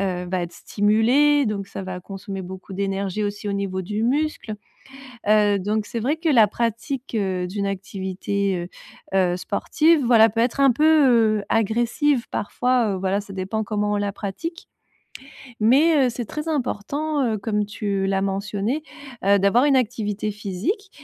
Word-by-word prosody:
heu, 180 -2 -2
va 185 - 0
être 170 - -6
stimulé, 245 +11 +3
donc 200 -2 -3
ça 195 - -7
va 185 -1 -6
consommer 195 +1 -7
beaucoup 190 +1 -9
d'énergie 195 +1 -2
aussi 205 0 -3
au - - -1
niveau 195 -1 -2
du 210 +4 -3
muscle, 270 -3 -1 0.7
heu, 210 -1 +4
donc 210 +2 -1
c'est 230 - -4
vrai 280 +8 0
que 325 0 -2
la 230 -7 +6
pratique, 235 +4 -3
heu, 190 -4 -1
d'une 200 +2 -3
activité, 190 -1 -3 0.4
heu 195 - +3
heu, 180 -1 +2
sportive, 300 - +2
voilà 225 -2 +6
peut 225 +2 -2
être 245 +4 0
un 275 - +6
peu, 300 +6 0 0.6
heu, - - -7
agressive 235 +5 +1
parfois, 245 0 0
heu, - - -2
voilà, 190 +2 0
ça 200 -1 -11
dépend 195 +3 -3
comment 210 0 -1
on - - +1
la 205 -1 -1
pratique 330 - -6 0.9
mais 275 +5 +4
heu, - - 0
c'est 235 +1 -5
très 300 +8 -6
important, 285 +2 -1
heu, 220 -3 0
comme 210 +1 -1
tu 200 -2 -2
l'as 195 0 0
mentionné, 200 +7 -2 0.4
heu, 200 +1 +5
d'avoir 200 +7 +3
une 285 -2 +4
activité 215 -4 -1
physique. 210 - -3
210 Hz, 170 wpm, -23 LUFS, 195-245 Hz, 0.9 s, la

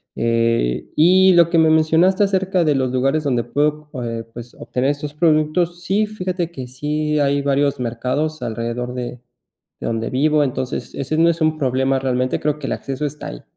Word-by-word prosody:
eh, 115 - 0
y 185 +3 +5
lo 170 -1 +5
que 170 - +2
me 160 -1 +5
mencionaste 160 +5 +3
acerca 190 -2 +1
de 150 -3 +2
los 130 -2 0
lugares 135 +4 +1
donde 125 -4 0
puedo, 150 +4 -1
eh, 115 -1 -4
pues, 120 +1 -10
obtener 130 +3 -1
estos 145 0 -6
productos. 165 +2 +1
Sí, 205 +4 +1
fíjate 185 -4 -3
que 130 -5 -7
sí 150 +4 -2
hay 140 0 +2
varios 140 -1 +1
mercados 125 +6 -2
alrededor 120 +2 -3
de 125 -1 -5 0.6
de - - -4
donde 115 0 -2
vivo. 150 +3 +2
Entonces, 130 -1 -4
ese 140 +3 -2
no 165 +1 +5
es 165 0 -2
un 155 0 +2
problema 130 -1 +1
realmente, 130 -1 -1
creo 150 0 -1
que 135 - -5
el - - -1
acceso 135 +2 -4
está 150 +1 -6
ahí. - - -8
145 Hz, 185 wpm, -20 LUFS, 125-160 Hz, 0.6 s, y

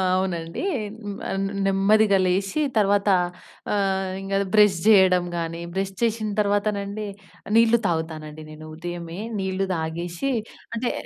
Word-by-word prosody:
అవునండి. 175 - -2 0.4
హ్మ్. 195 -1 -3 0.2
నెమ్మదిగా 195 +1 +4
లేసి, 195 +9 0 0.2
తర్వాత 205 0 +3 0.7
ఆహ్, 195 -2 0
ఇంగ 195 0 -5 0.2
బ్రష్ 210 -4 +6
చేయడం 185 -4 +6
గానీ, 165 0 -3
బ్రష్ 195 0 -1
చేషిన 220 -2 0
తర్వాతనండి 205 0 -1 0.5
నీళ్లు 230 0 +5
తాగుతానండి 155 -2 -4
నేను 155 +1 -10
ఉదయమే. 170 +1 -6 0.2
నీళ్లు 190 0 -1
తాగేషి 170 +9 -3 0.4
అంటే 240 +1 -1
195 Hz, 110 wpm, -24 LUFS, 170-205 Hz, 0.7 s, బ్రష్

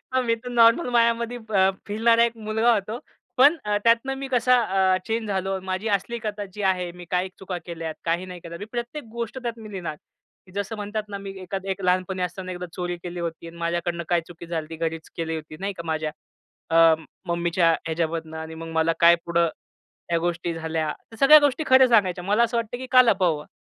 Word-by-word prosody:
हा, 260 - +3
मी 230 -2 +2
तर 250 - -4
नॉर्मल 235 +5 +5
मायामध्ये 235 0 +2 0.5
फिरणारा 230 +2 +4
एक 235 0 -1
मुलगा 220 +2 +2
होतो. 215 +3 -3 0.4
पण 285 +6 +6
त्यातनं 230 +5 +2
मी 270 0 -6
कसा 250 0 +4 0.4
अ, - - +3
चेंज 225 -1 -2
झालो. 195 0 -1
माझी 190 +3 -3
असली 210 +4 -1
कथा 210 -2 -4
जी 210 - -5
आहे, 180 -2 +1
मी 175 0 -11
काही 180 +1 +1
चुका 190 -2 -5
केल्यात, 165 -2 -5
काही 170 +3 0
नाही 180 -1 -9
केलं. 170 0 -8
मी 205 - -6
प्रत्येक 240 +4 -4
गोष्ट 235 +2 -4
त्यात 235 -1 -4
मी 215 -1 -10
लिहिणार, 175 -6 -5 0.5
की 185 - -17
जसं 200 +3 -3
म्हणतात 210 +1 -3
ना, 200 -1 -5
मी 195 0 -7
एखादा 195 +1 -4
एक 190 - -3
लहानपणी 185 +1 +1
असताना 185 +1 -4
एकदा 180 0 -5
चोरी 175 -1 -3
केली 175 0 -5
होती 170 0 -5
आणि 165 0 -10
माझ्याकडून 170 0 -2
काय 175 -1 +3
चुकी 170 -1 -11
झाली, 165 -2 -3
ती 165 - -6
घरीच 165 -1 -3
केली 160 -1 -2
होती, 155 0 -8
नाही 200 +1 -2
का, 170 - -5
माझ्या 155 -1 -1 0.6
अ, 165 0 +7 0.3
मम्मीच्या 170 0 +2 0.2
ह्याच्यामधनं. 160 0 -2
आणि 160 0 -7
मग 165 0 -7
मला 160 0 +2
काय 170 0 +8
पुढं 170 0 +2 0.6
ह्या 170 - +3
गोष्टी 170 0 -2
झाल्या. 160 -1 -2 0.2
तर - - -10
सगळ्या 275 +6 +8
गोष्टी 290 +2 +1
खऱ्या 260 0 +7
सांगायच्या. 185 -6 +3
मला 205 +4 +3
असं 235 0 +1
वाटतं, 240 +3 -3
का 255 0 +9
लपवावं? 180 -10 +1
190 Hz, 205 wpm, -24 LUFS, 170-230 Hz, 0.6 s, का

